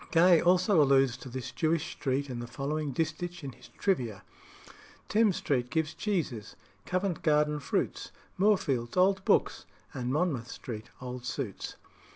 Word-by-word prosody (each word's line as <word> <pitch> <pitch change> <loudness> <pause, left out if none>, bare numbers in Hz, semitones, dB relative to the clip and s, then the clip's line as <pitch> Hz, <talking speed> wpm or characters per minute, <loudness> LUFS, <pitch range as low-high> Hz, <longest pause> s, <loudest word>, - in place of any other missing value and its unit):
Gay 170 0 +6
also 180 0 +4
alludes 135 -3 +4
to 130 +1 -10
this 130 +1 -5
Jewish 165 +1 0
street 140 +1 -1
in 125 -3 -5
the 120 - -5
following 145 +4 -3
distich 165 +4 -3
in 135 - -5
his - - -16
"Trivia" 120 - -1 0.9
"Thames 215 -3 +3
Street 125 -3 0
gives 160 +1 -1
cheeses, 155 - -2 0.3
Covent 185 -2 -1
Garden 150 -1 +2
fruits, 140 - -2 0.2
Moorfields 145 - +1
old 190 +1 +4
books, - - +2 0.3
and 125 -1 -3
Monmouth 140 -6 0
Street 110 -4 -7
old 125 -1 -6
suits." 120 -4 -4
150 Hz, 145 wpm, -30 LUFS, 125-175 Hz, 0.9 s, Gay